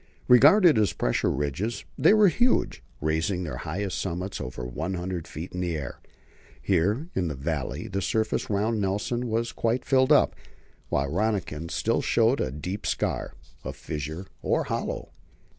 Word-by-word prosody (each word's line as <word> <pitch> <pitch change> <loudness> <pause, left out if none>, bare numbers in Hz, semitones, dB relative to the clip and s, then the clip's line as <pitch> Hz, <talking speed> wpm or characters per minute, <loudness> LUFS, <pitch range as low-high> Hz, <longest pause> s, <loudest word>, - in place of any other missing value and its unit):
Regarded 145 - +7
as 105 - +2
pressure - - 0
ridges 75 - -2
they 155 +8 +5
were 215 -1 +6
huge, 245 +7 +2 0.2
raising 80 +5 0
their 75 -8 -4
highest 90 +7 -3
summits 90 +1 -3
over 60 0 -6
100 90 +6 -4
feet 80 +4 -7
in 90 - -4
the 85 -3 -1
air. 70 -4 -6 0.6
Here 100 - +1
in 90 -2 0
the 75 - -3
valley 70 0 -3
the 100 - -2
surface 110 +2 0
round 105 +2 0
Nelson 105 +5 -1
was 115 +1 -1
quite 120 +2 -1
filled 130 +1 +3
up, 150 - +5 0.5
while 70 +1 +1
Rönniken 95 -7 -1
still - - 0
showed - - +2
a - - 0
deep 90 +9 -5
scar - - -2 0.3
a - - -5
fissure 75 +5 -5 0.2
or - - +1
hollow. - - -3
95 Hz, 155 wpm, -26 LUFS, 80-115 Hz, 0.6 s, Regarded